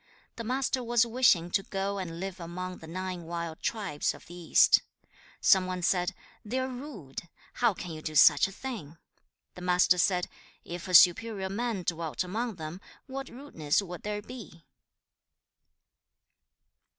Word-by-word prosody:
The 230 - -5
Master 255 +2 -1
was 240 0 +3
wishing 225 -8 +3
to 195 - +2
go 195 +1 -3
and 170 -3 -5
live 190 0 -5
among 180 +2 -6
the 160 - -11
nine 185 +1 -4
wild 170 -1 -5
tribes 200 -10 -1
of - - -15
the 175 - -12
east. 175 -2 +5 0.2
2. - - -38 0.3
Some 190 -2 +5
one 180 -1 -4
said, 180 0 +1 0.3
'They 225 +4 -3
are 260 0 0
rude. 245 - -8 0.3
How 235 -5 +4
can 180 - -7
you 155 -1 -7
do 155 0 -5
such - - +7
a - - -9
thing?' 195 - -7 0.6
The 180 - -11
Master 180 0 +3
said, 180 -1 +2 0.4
'If 175 +2 -6
a 185 - +2
superior 190 +3 +5
man 215 -1 -2
dwelt 165 -3 -2
among 220 +5 -3
them, 165 +2 -7 0.2
what 270 0 -6
rudeness 235 - -1
would 175 -2 -8
there 210 0 -4
be?' 215 -9 -11
185 Hz, 160 wpm, -29 LUFS, 170-225 Hz, 0.6 s, such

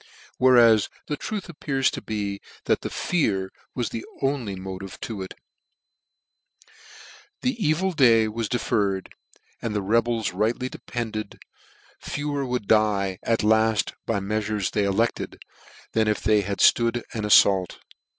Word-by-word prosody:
Where 130 0 +6
as 115 -3 +5 0.2
the 150 - -2
truth 205 +7 -5
appears 140 -5 0
to - - -6
be, 100 -2 -4 0.2
that - - +1
tear 95 - -1 0.2
was 120 -2 -1
the 115 - -5 0.2
only 135 -8 -1
motive 95 0 -7
to 110 -6 -5
it: 95 - -7 2.1
the 255 0 +2
evil 170 +5 +1
day 115 -8 +5
was 110 0 -3
deferred: 100 -5 -1 0.5
and 110 -2 -3
the 105 - 0
rebels 115 0 +1
rightly 115 +6 0
depended, 110 -5 -5 0.6
fewer 145 -1 -3
would 125 -5 -3
die 100 -3 +2
at 115 -1 0
lad 110 -1 +2
by 115 - 0
the 100 - -7
meal'tirc's 105 -2 -1
they 105 -2 +1
elected, 110 +4 -1 0.5
than 110 -1 +1
if 105 - 0
they 105 0 +4
had 100 0 -3
flood 115 0 +4
an 110 - -3
aflault. 100 -3 +4
110 Hz, 140 wpm, -24 LUFS, 100-120 Hz, 2.1 s, Where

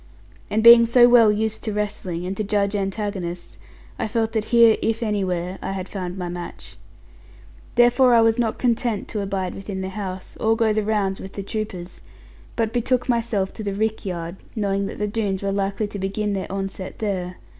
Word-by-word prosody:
And 220 +1 0
being 235 0 +9
so 240 +1 +6
well 235 -3 +6
used 220 +1 -2
to 215 - -2
wrestling, 205 -4 -3
and 190 +2 -3
to 215 - -2
judge 200 0 0
antagonists, 195 -3 -4 0.4
I - - -1
felt 225 0 -1
that 220 -2 -1
here 230 -2 +5
(if 225 +1 0
anywhere) 190 -4 -2
I - - -3
had 190 -1 -4
found 185 -2 -5
my 180 -1 -3
match. 175 0 -8 1.0
Therefore 245 +1 +5
I 230 - +6
was 225 +1 +3
not 225 -2 0
content 235 -3 0
to 210 - -3
abide 195 -2 -2
within 195 -1 -6
the 190 - -3
house, 190 -2 -6
or 225 +1 +2
go 225 -2 +2
the 215 - +1
rounds 205 -2 0
with 190 - -9
the 200 - -5
troopers; 190 -4 -6 0.5
but 225 -1 -1
betook 245 +1 0
myself 230 -5 0
to 220 - -7
the 200 -1 -3
rick 220 +1 -1
yard, 175 -1 -5 0.2
knowing 200 -2 0
that - - -7
the 210 - -1
Doones 205 -3 -2
were 200 - 0
likely 195 +2 -1
to 205 - -6
begin 200 +2 -2
their 190 -1 -4
onset 195 -1 -5
there. 185 -4 -3
205 Hz, 195 wpm, -23 LUFS, 190-225 Hz, 1.0 s, being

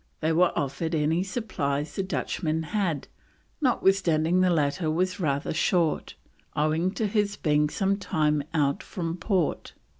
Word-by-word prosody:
They 160 +1 +1
were 175 +2 +4
offered 160 +4 -1
any 160 +3 +1
supplies 155 - -2
the - - 0
Dutchman 160 -4 -2
had, 180 -9 0 0.5
notwithstanding 185 - +2
the 185 - +4
latter 155 0 +1
was 185 +5 0
rather 140 -5 -1
short, 165 0 +1 0.4
owing 155 +4 +1
to 220 - -1
his 205 0 0
being 150 -1 +2
some 195 +3 0
time 150 -6 +1
out 145 -4 +1
from 165 -2 -4
port. 185 -3 -1
165 Hz, 140 wpm, -26 LUFS, 150-190 Hz, 0.5 s, were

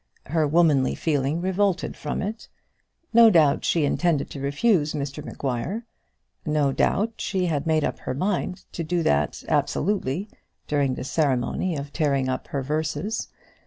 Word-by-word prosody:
Her 155 +1 +1
womanly 150 -4 +3
feeling 150 +1 0
revolted 190 0 0
from 150 - -3
it. 215 +3 -5 0.6
No 230 0 +8
doubt 155 -7 +4
she 165 -4 +2
intended 160 0 +1
to 140 - -6
refuse 150 +3 +1
Mr 145 0 -4
Maguire. 140 - -3 0.6
No 150 -3 +1
doubt 215 +10 +1
she 185 -2 0
had 155 -3 -1
made 155 -1 +2
up - - -2
her 130 - -4
mind 185 +2 -2
to 170 - -4 0.2
that 75 - +1
absolutely, 190 -2 0 0.4
during 140 -3 +1
the - - -5
ceremony 145 +4 0
of 140 0 -6
tearing 140 -4 +1
up 130 - -3
her 140 -2 -3
verses. 155 - -2
155 Hz, 145 wpm, -24 LUFS, 140-180 Hz, 0.6 s, No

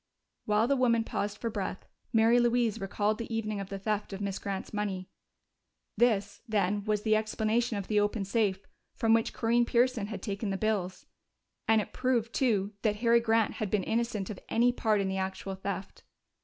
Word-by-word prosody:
While 210 +2 +3
the 280 - +3
woman 235 -3 +3
paused 205 -2 -3
for 230 0 -3
breath, 195 -3 -4 0.3
Mary 225 +2 +5
Louise 240 -3 +2
recalled 205 +3 0
the 230 - -5
evening 215 -2 -2
of 195 -1 -6
the 195 - -4
theft 205 +1 -2
of 195 - -5
Miss 200 -1 -3
Grant's 195 0 -5
money. 195 -3 -3 0.9
This, 205 -4 +1
then, 205 -1 +1
was 210 -1 0
the 215 -1 +3
explanation 220 +1 0
of 200 - -4
the 210 -1 +2
open 205 0 0
safe, 200 -2 0 0.3
from 225 0 +3
which 225 0 +2
Corinne 235 +1 +2
Pearson 240 -3 +2
had 210 -3 -6
taken 205 0 -3
the 195 - -1
bills. 195 -4 -1 0.6
And 220 -1 +5
it - - -8
proved, 240 -3 0
too, 210 -6 +1
that 210 -2 +1
Harry 235 +2 +4
Grant 225 -2 +2
had 210 - -1
been 205 -2 +1
innocent 220 -2 -1
of 200 - -7
any 240 +2 +4
part 220 -4 +1
in 195 - -1
the 190 0 -2
actual 190 0 -3
theft. 190 0 -5
215 Hz, 190 wpm, -30 LUFS, 200-230 Hz, 0.9 s, Mary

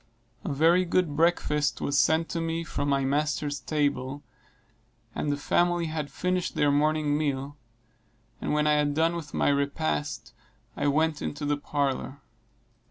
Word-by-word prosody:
A - - -3
very 165 +6 +4
good 175 -4 0
breakfast 150 -2 +1
was 140 - -1
sent 160 +1 +3
to 165 - -2
me 165 0 -2
from 145 -3 -3
my 135 -1 +2
master's 145 +1 0
table, 145 -2 -1 0.9
after 150 - -2
the 145 - 0
family 175 +3 +1
had 155 -2 -3
finished 180 +5 -2
their 145 -1 +3
morning 150 0 +2
meal; 145 -2 -2 0.9
and - - -2
when 150 0 +2
I 150 - +4
had 145 -1 +1
done 165 +2 +2
with 160 -4 -6
my - - +2
repast 145 0 -1 0.4
I - - -1
went 155 +1 +1
into 145 0 -4
the 145 0 +1
parlor. 140 -2 -2
150 Hz, 155 wpm, -27 LUFS, 145-160 Hz, 0.9 s, very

